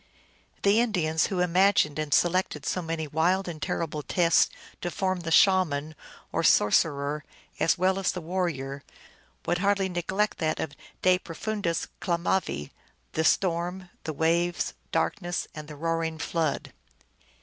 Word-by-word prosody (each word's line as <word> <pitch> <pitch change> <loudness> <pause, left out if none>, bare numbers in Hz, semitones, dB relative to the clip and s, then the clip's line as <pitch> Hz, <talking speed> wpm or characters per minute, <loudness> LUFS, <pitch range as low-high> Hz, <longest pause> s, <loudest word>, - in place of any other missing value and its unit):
The 200 +3 +5
Indians, 175 -9 +1
who 185 -2 -1
imagined 180 -4 +3
and 155 -1 -3
selected 185 +4 +2
so 180 - -1
many 165 -1 -3
wild 175 +6 +1
and 160 -3 -6
terrible 155 -1 -2
tests 165 +4 +3 0.3
to 175 - -2
form 185 +1 -1
the 170 -1 -5
Shaman, 160 -5 +3 0.4
or - - 0
sor 105 - +5
cerer, 145 -1 +1 0.4
as 165 - +3
well 190 +2 +2
as 190 - +1
the 180 - -5
warrior, 160 -6 -3 0.6
would 175 +1 0
hardly 200 0 +2
neglect 185 +4 -1
that 155 -1 0
of 160 - -2 0.3
de 185 0 +5
profundis 180 0 -3
clamavi, 170 - -1 0.4
the 160 - 0
storm, 180 +1 0
the 160 - -3
waves, 170 +3 +1 0.2
darkness, 175 -2 -1
and 155 -2 -8
the 150 - -9
roaring 165 +1 -1
flood. 160 -3 -2
170 Hz, 140 wpm, -27 LUFS, 155-185 Hz, 0.6 s, The